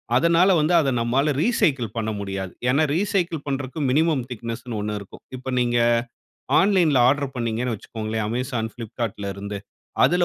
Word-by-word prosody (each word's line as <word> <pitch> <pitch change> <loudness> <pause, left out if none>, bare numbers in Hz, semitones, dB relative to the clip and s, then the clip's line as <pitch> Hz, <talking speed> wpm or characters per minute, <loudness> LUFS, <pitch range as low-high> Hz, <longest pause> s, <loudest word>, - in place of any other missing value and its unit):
அதனால 170 +7 +4
வந்து 155 +4 +2
அத 140 -4 +2
நம்மால 135 +6 +2
ரீசைக்கிள் 135 - +1
பண்ண 110 -1 -1
முடியாது. 95 -2 -4 0.2
ஏன்னா? 140 +5 +3
ரீசைக்கிள் 180 -5 0
பண்றதுக்கு 135 +2 -3
மினிமம் 155 -2 +2
திக்னெஸ்னு 115 0 -5
ஒண்ணு 105 0 -2
இருக்கும். 100 - -12
இப்ப 130 +1 -5
நீங்க 120 -1 +1 0.8
ஆன்லைன்‌ல 180 -9 +3
ஆர்டர் 140 0 0
பண்ணீங்கன்னு 115 0 -1
வச்சுக்கோங்களேன் 110 0 -4
Amazon, 120 -1 -2
Flipkartல 115 -3 -5
இருந்து 100 +1 -5 0.5
அதுல 180 0 +3
125 Hz, 140 wpm, -23 LUFS, 110-155 Hz, 0.8 s, அதனால